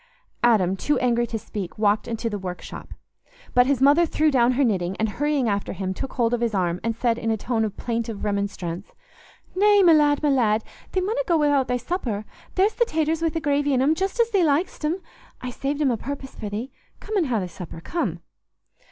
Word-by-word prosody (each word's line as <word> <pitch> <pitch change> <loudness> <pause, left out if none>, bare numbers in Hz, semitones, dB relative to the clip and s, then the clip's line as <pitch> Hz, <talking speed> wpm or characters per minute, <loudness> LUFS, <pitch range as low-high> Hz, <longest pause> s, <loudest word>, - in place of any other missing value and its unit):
Adam, 205 -6 +3
too 285 +10 0
angry 240 -1 +1
to 225 - -3
speak, 205 -4 -6
walked 210 +1 +2
into 230 0 -3
the 210 -2 -3
workshop. 180 -1 -7 0.6
But 250 0 +5
his 270 -2 +2
mother 290 +5 +6
threw 310 0 +2
down 250 -2 +4
her 275 +3 +2
knitting, 190 -6 0
and, 220 - +1
hurrying 285 +4 0
after 200 -2 -1
him, 190 0 -3
took 270 +7 -5
hold 235 -1 +1
of 240 - 0
his 230 -3 0
arm, 180 -2 0
and 230 0 -1
said, 235 0 0
in 225 - -2
a 220 - +1
tone 225 +1 -1
of 210 -2 -3
plaintive 230 -3 -3
remonstrance, 200 -3 -3 0.6
"Nay, 410 +1 +5
my 340 -2 +7
lad, 295 -1 +3
my 295 - +3
lad, 225 -5 +2 0.3
thee 375 - +1
munna 440 +7 0
go 340 -3 +3
wi'out 290 -3 +2
thy 250 - 0
supper; 245 - -3 0.3
there's 395 +3 +3
the 475 +2 +2
taters 320 -3 0
wi' 330 - +2
the 325 - -3
gravy 290 -2 +1
in 255 - +2
'em, 295 +3 +4
just 385 +7 -2
as 465 0 +3
thee 390 -4 +3
lik'st 315 +3 0
'em. 330 +5 -1 0.4
I 250 - -5
saved 280 +3 -3
'em 285 -4 +3
o' 235 - 0
purpose 270 +2 -6
for 210 - -6
thee. 225 +6 -5 0.3
Come 435 - -5
an' 370 -5 +3
ha' 250 -5 0
thy 185 - -2
supper, 175 -1 -9
come." 185 - -3
250 Hz, 220 wpm, -24 LUFS, 215-300 Hz, 0.6 s, my